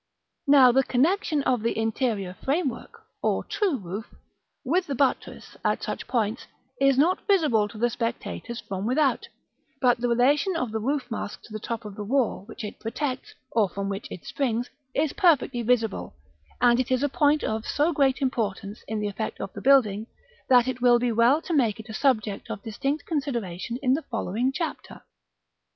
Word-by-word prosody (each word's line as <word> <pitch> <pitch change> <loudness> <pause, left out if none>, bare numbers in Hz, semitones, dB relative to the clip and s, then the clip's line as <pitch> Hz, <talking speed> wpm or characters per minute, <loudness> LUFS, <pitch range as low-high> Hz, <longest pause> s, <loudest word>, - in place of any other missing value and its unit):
Now 270 -3 +7
the 265 +2 +4
connexion 300 +4 +1
of 250 -4 +1
the 230 0 -1
interior 225 -4 -1
frame 285 +2 +1
work 245 - -11 0.2
(or - - 0
true 380 -9 0
roof) 200 +2 -7 0.5
with 350 +8 +1
the 280 - -2
buttress, 270 +1 -1
at - - 0
such - - -4
points, 225 -1 -1 0.3
is 275 -1 +4
not 335 +7 +2
visible 300 - +3
to 215 - -12
the 240 +2 +1
spectators 235 0 -4
from 195 +2 -4
without; 265 0 +1 0.5
but 245 -2 +3
the 245 - 0
relation 275 +9 +3
of 255 -9 -2
the 220 - -2
roof 265 +2 -2
mask 210 -2 -5
to 220 - -13
the 215 - -4
top 230 +1 -5
of 210 - -7
the 210 - -5
wall 235 -3 0
which 225 - -9
it 210 - -7
protects, 255 +3 -4 0.2
or 215 -4 +2
from 195 +2 -4
which 195 +1 -4
it 180 - -9
springs, 245 -3 -2 0.2
is 300 0 +1
perfectly 295 - +3
visible; 225 - 0 0.4
and 240 0 +4
it 255 - 0
is 255 +1 +1
a - - +3
point 290 +2 +2
of 220 0 -2
so 310 +4 +1
great 275 -2 +2
importance 215 -5 -2
in 220 -1 -2
the 210 - -1
effect 210 +2 -4
of - - -5
the - - -7
building, 225 -6 +4 0.4
that 250 -1 +6
it 255 -1 -3
will 245 -1 +6
be 240 0 0
well 240 +8 +4
to 350 - -3
make 235 -8 +2
it 220 +1 -10
a - - -6
subject 215 -6 0
of 200 - -6
distinct 275 +7 -2
consideration 235 - -3
in 255 -1 +4
the 300 - 0
following 230 - -1
Chapter. 330 +3 -5
245 Hz, 190 wpm, -26 LUFS, 220-275 Hz, 0.5 s, Now